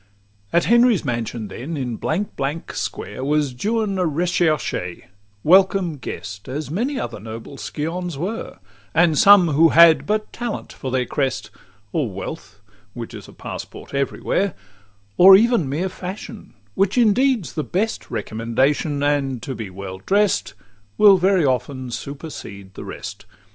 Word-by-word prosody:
XXVIII - - +2
At 170 - +4
Henry's 235 -5 +4
mansion 120 -3 -3
then, 150 +10 -6
in 125 -4 -3
Blank 185 - -2
Blank 145 +4 -3
Square, 105 +6 -5
Was 145 -1 +1
Juan 210 - -1
a - - +2
recherchè, 155 - -1 0.4
welcome 185 -2 +4
guest, 100 -5 -7
As 145 +2 -4
many 250 - -1
other 115 -3 -5
noble 110 +5 -8
scions 165 +2 -4
were; 195 +9 -4 0.4
And 165 -1 +4
some 195 +1 +7
who 160 +3 +5
had 165 -1 +6
but 215 +1 -1
talent 240 -2 -5
for 135 - -6
their 130 -1 0
crest; 130 -5 -2 0.4
Or 145 -7 0
wealth, 105 - -8 0.3
which 120 -2 -7
is - - -9
a - - -13
passport - - -8
every 140 -1 -2
where; 195 -3 0 0.6
Or 190 +2 +10
even 220 - +3
mere 160 +7 -1
fashion, 190 +4 -8 0.2
which 195 - +1
indeed's 240 - +3
the 155 - -2
best 210 +8 -2
Recommendation; 125 +7 -1
and 140 -3 0
to 135 - -4
be 110 -5 -6
well 95 0 -8
drest 205 0 +1 0.4
Will 200 -3 +7
very 185 -3 +3
often 130 -1 -1
supersede 120 - -8
the - - -8
rest. - - -8
155 Hz, 150 wpm, -21 LUFS, 125-190 Hz, 0.6 s, Or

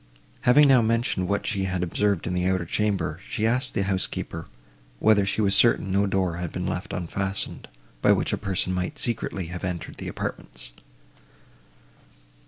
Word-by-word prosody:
Having 145 +3 +7
now 130 -3 +6
mentioned 115 -5 +1
what 100 +1 -1
she 100 -3 0
had 95 -2 -1
observed 100 +1 0
in 90 - -2
the 90 0 0
outer 95 -2 +1
chamber, 95 -4 -1
she 110 - -1
asked 125 +4 +1
the 100 - +1
housekeeper, 95 -4 -2 0.5
whether 100 - +4
she 105 - 0
was 100 -2 +3
certain 100 -2 +4
no 100 +1 +2
door 95 -3 0
had 90 -2 -4
been 90 - -3
left 90 +3 -3
unfastened, 95 +3 -3 0.3
by - - +5
which - - +1
a - - +1
person 95 -2 -1
might 90 -1 -2
secretly 105 -5 -2
have 90 - -6
entered 90 -2 -4
the - - -6
apartments? - - -5
95 Hz, 170 wpm, -25 LUFS, 90-105 Hz, 0.5 s, Having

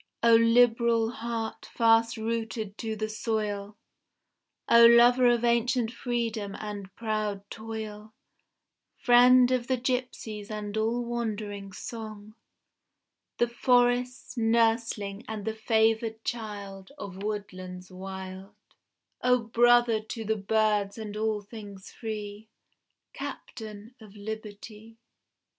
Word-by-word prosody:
O 235 0 +6
liberal 230 0 +4
heart 230 -1 -5
fast 230 0 +3
rooted 225 -2 -3
to 220 -1 -3
the 215 0 -2
soil, 210 -2 -3 0.9
O 235 0 +7
lover 240 +2 +6
of 240 -1 +3
ancient 235 0 +2
freedom 230 -5 -3
and 205 -2 -6
proud 215 -3 -3
toil, 220 -1 -7 0.9
Friend 250 +1 +6
of 250 -2 0
the 260 - +1
gipsies 245 -4 -3
and 210 -1 -5
all 230 +2 0
wandering 210 -4 -4
song, 215 0 -8 1.0
The 240 - +3
forest's 245 +1 +1
nursling 225 -3 +1
and 215 -2 -5
the 220 - -1
favoured 220 0 +1
child 205 -4 -6
Of 190 -1 -8
woodlands 185 -3 -6
wild 190 +1 -8 0.7
O 250 0 +4
brother 240 0 +4
to 220 +1 -7
the 220 +1 +1
birds 210 0 +1
and 215 -2 -6
all 215 -1 -1
things 205 -2 -10
free, 215 -1 -6 0.7
Captain 215 +1 -8
of 215 -2 -14
liberty! 215 +1 -8
220 Hz, 110 wpm, -28 LUFS, 210-235 Hz, 1.0 s, O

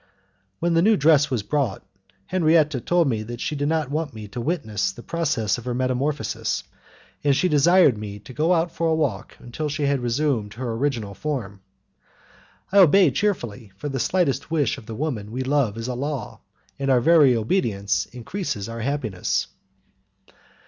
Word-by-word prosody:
When 170 0 0
the 165 - +4
new 215 +3 +4
dress 150 0 +4
was 125 -6 -1
brought, 135 -5 -1 0.4
Henriette 155 -6 +2
told 175 -3 +3
me 110 -5 0
that 120 +2 -7
she 150 - -2
did 145 0 -1
not 155 -3 0
want 150 -4 -2
me 105 -1 -8
to 120 - -5
witness 110 - -1
the 120 - -12
process 145 -11 -1
of 120 - -12
her 125 -1 -2
metamorphosis, 130 +3 -1 0.6
and 140 -2 +3
she 185 - +2
desired 150 - +4
me 105 -1 -6
to 130 - -12
go 155 +7 +1
out 170 -1 +2
for 165 - -1
a 160 - +2
walk 110 -10 -2
until 150 +6 -5
she 150 +1 -3
had 140 -1 +2
resumed 120 -4 -1
her 120 -1 -3
original 115 -5 -2
form. 105 -5 -4 1.1
I 200 - +5
obeyed 180 -4 +6
cheerfully, 120 - -2
for 145 +9 -4
the 135 -1 -3
slightest 145 -4 0
wish 150 -6 0
of 110 - -16
the 115 - -6
woman 115 -7 -3
we 130 +3 -3
love 130 -6 +1
is 115 +1 -4
a 125 - -2
law, 135 -2 -4 0.4
and 135 0 -1
our 130 -2 +5
very 145 -2 +5
obedience 110 - 0
increases 125 - -5
our 115 0 -6
happiness. 115 -7 -1
135 Hz, 175 wpm, -23 LUFS, 115-155 Hz, 1.1 s, obeyed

